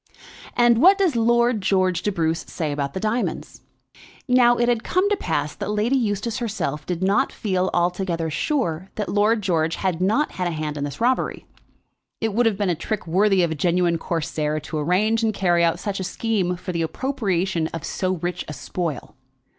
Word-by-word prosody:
"And 240 -1 +5
what 385 +4 +7
does 370 -9 +2
Lord 235 0 +3
George 185 -2 +1
de 205 - 0
Bruce 165 -3 0
say 155 -3 -3
about 140 -1 -3
the - - -1
diamonds?" 220 +4 -2 0.7
Now 245 -1 +5
it 240 - +2
had 240 -2 +1
come 370 +2 +1
to - - +4
pass 150 - -2
that - - -5
Lady 210 +5 +1
Eustace 225 -1 -1
herself 175 - -3
did 180 0 -2
not 195 +2 +2
feel 185 -3 -1
altogether 175 -2 -1
sure 190 - -1
that 210 -2 -3
Lord 210 +1 +2
George 165 -3 +1
had 185 -3 -2
not 220 +11 +2
had 180 -1 -2
a 165 -2 -3
hand 150 -1 -3
in 145 -1 -2
this 145 +9 -7
robbery. 255 +2 0 0.7
It 225 -2 -1
would 235 +2 +3
have 210 -3 0
been 205 -1 0
a 180 - +2
trick 200 +6 -4
worthy 190 +2 +3
of 170 - 0
a - - +1
genuine 170 +1 +1
Corsair 155 -2 -2
to 155 +1 -4
arrange 205 +9 +2
and 220 -2 0
carry 175 -3 +2
out 165 -1 +2
such 200 -2 -3
a - - -2
scheme 190 -2 -1
for 180 +1 -6
the 170 -2 -2
appropriation 190 - -1
of 165 -2 -7
so 185 -1 -1
rich 175 +1 -3
a 150 - -6
spoil. 160 -1 -5
190 Hz, 195 wpm, -23 LUFS, 165-225 Hz, 0.7 s, what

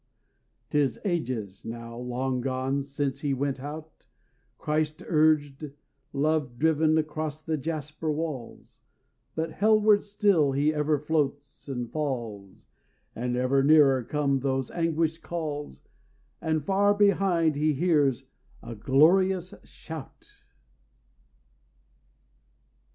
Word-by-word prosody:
'Tis 145 -3 +1
ages 120 - -3
now 115 0 -7
long 125 +1 -2
gone 130 +2 -1
since 140 0 -3
he 140 -2 0
went 140 0 -2
out, 150 +3 -9 0.5
Christ 155 0 -1
urged, 150 -3 +1 0.4
love 145 -4 0
driven, 160 +1 +3
across 155 0 -3
the 160 0 -1
jasper 155 +1 -3
walls; 150 -6 -6 0.6
But 160 +1 -2
hellward 215 0 +4
still 200 -9 +2
he 145 +3 +2
ever 150 0 +1
floats 145 -2 -2
and 125 -3 -4
falls, 115 -10 -4 0.5
And 125 +1 -2
ever 130 +2 +2
nearer 140 -3 +5
come 140 +2 0
those 135 -1 -1
anguished 165 -1 0
calls; 150 - -5 0.6
And 160 -3 -1
far 200 +1 +3
behind 185 -6 +3
he 150 +1 +1
hears 145 -4 +2 0.4
a 120 - -7
glorious 175 - +3
shout. 160 -4 -10
150 Hz, 105 wpm, -27 LUFS, 135-160 Hz, 0.6 s, nearer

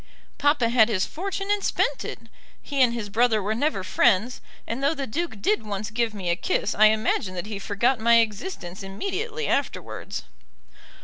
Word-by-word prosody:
Papa 290 -5 +3
had 235 -2 +5
his 190 -4 +1
fortune 390 +3 -4
and 410 -1 +1
spent - - 0
it. - - -5 0.4
He 280 -2 -2
and 250 -2 +5
his 230 -3 -4
brother 225 +1 +2
were 210 +2 -1
never 235 -4 0
friends, 210 +5 +2 0.2
and 235 +4 -4
though 290 +3 +2
the 275 - -3
Duke 240 -5 -4
did 215 +2 +2
once 205 0 -4
give 230 0 0
me 180 -4 -2
a - - +2
kiss 205 - -1
I 215 - +5
imagine 215 -3 +2
that 175 - -4
he 210 -2 -5
forgot 220 +5 +1
my 235 +1 +5
existence 215 - -1
immediately 395 - -3
afterwards." - - -2
225 Hz, 180 wpm, -25 LUFS, 205-280 Hz, 0.4 s, had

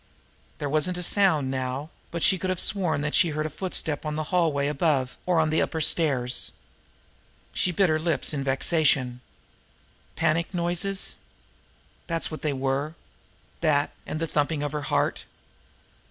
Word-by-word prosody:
There 145 - -3
wasn't 155 +5 +1
a 180 - -3
sound 165 -9 +3
now, 130 +4 -3 0.2
but 170 -1 -3
she 190 - +4
could 185 - -2
have 185 -2 -1
sworn 160 -7 +1
she 170 - +4
had 155 - -3
heard 155 0 -1
a 155 - -3
footstep 155 -3 -2
on 155 -1 -3
the 155 - -1
hallway 160 -6 +2
above, 145 -3 +1
or 175 -2 +3
on 160 -1 +2
the 160 - +3
upper 160 - -1
stairs. 135 -6 +1 1.0
She 180 - +1
bit 190 +2 +3
her 155 -1 +2
lips 165 -1 0
in 140 -2 -2
vexation. 135 -2 +2 0.9
Panic 165 +2 +1
noises! 175 +3 0 0.9
That's 165 -1 -1
what 155 - -6
they 150 - 0
were! 135 +3 -1 0.6
That, 145 -3 +2 0.2
and 155 - -3
the 165 - 0
thumping 150 -1 0
of 145 - -2
her 150 0 -3
heart! - - 0
155 Hz, 160 wpm, -26 LUFS, 145-170 Hz, 1.0 s, she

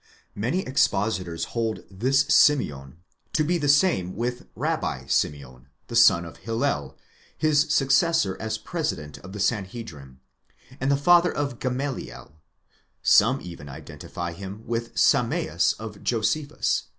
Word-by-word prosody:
Many 125 - -1
expositors 100 - 0
hold 115 -2 -2
this 130 +8 +2
Simeon 80 - +2 0.3
to 155 - +2
be 175 +3 0
the 145 -2 0
same 140 - +3
with 120 +3 -2
the - - -19
Rabbi - - -2
Simeon, 65 -3 -2 0.2
the 120 - -5
son 85 -7 +6
of 85 - -11
Hillel, 115 - -2 0.4
his 155 -1 +3
successor 140 - +3
as 110 0 -3
president 105 - -4
of 95 - -11
the 105 - -6
Sanhedrim, 95 - -3 0.6
and 135 - 0
the 140 - +3
father 175 +4 +5
of 140 -5 -3
Gamaliel; 130 - -4 0.7
some 125 +6 +5
even 85 -5 -9
identify 80 +4 -7
him 100 +5 -9
with 115 0 -3
the - - -15
Sameas - - +2
of 110 -2 -8
Josephus 125 +6 0
115 Hz, 135 wpm, -25 LUFS, 85-140 Hz, 0.7 s, son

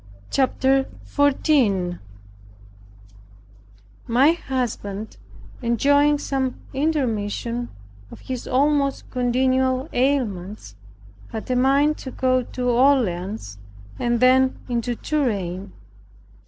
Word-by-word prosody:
CHAPTER 265 0 +2 0.2
14 255 - +1 2.1
My 255 +6 +5
husband 235 - -4 0.4
enjoying 285 +5 +3
some 265 -3 -2 0.2
intermission 240 -5 -1 0.4
of - - -12
his 255 -2 -6
almost 280 +1 +1
continual 260 +2 +1
ailments, 215 - -1 0.5
had 220 +3 -6
a - - +2
mind 275 +4 +3
to 265 - -7
go 255 0 +1
to 250 0 -3
Orleans, 210 - +1 0.4
and 240 -1 +1
then 260 +1 +4
into 240 0 -2
Touraine. 200 - -2
255 Hz, 85 wpm, -22 LUFS, 225-270 Hz, 2.1 s, My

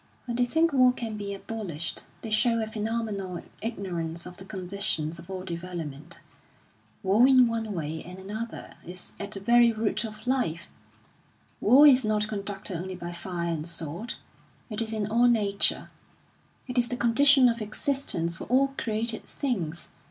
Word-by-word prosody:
When 240 -2 -3
they 245 0 +3
think 320 +5 +2
war 255 -2 +6
can 230 -3 -4
be 205 -1 -4
abolished, 195 -5 -4 0.2
they 225 - -5
show 230 +2 +3
a 220 - 0
phenomenal 215 -4 -3 0.2
ignorance 175 -7 -4
of 180 0 -10
the 190 - -9
conditions 180 -5 -2
of 170 - -13
all 185 -1 -5
development. 170 -3 -6 0.8
War 205 +6 +5
in 255 -2 +7
one 225 -2 -2
way 160 -2 -3
and 180 +2 -9
another 215 +5 -6
is 180 +1 -7
at 200 - -4
the 195 - -2
very 235 +3 +5
root 220 0 -1
of 215 0 -8
life. 245 -11 0 0.9
War 265 +7 +7
is 265 -3 +7
not 210 -1 +1
conducted 200 -2 -4
only 185 +2 -5
by 175 -1 -6
fire 170 -1 -3
and 160 +1 -3
sword; 170 +7 -3 0.6
it 215 +1 -1
is 225 -1 -2
in 215 -2 -1
all 230 +4 +3
nature, 205 -4 +2 0.8
it 250 -1 0
is 240 - +2
the 245 - -2
condition 260 +3 +6
of 235 -1 0
existence 215 - -1
for 170 - -8
all 270 +2 +3
created 225 0 -1
things. 180 - -3
210 Hz, 165 wpm, -27 LUFS, 180-235 Hz, 0.9 s, in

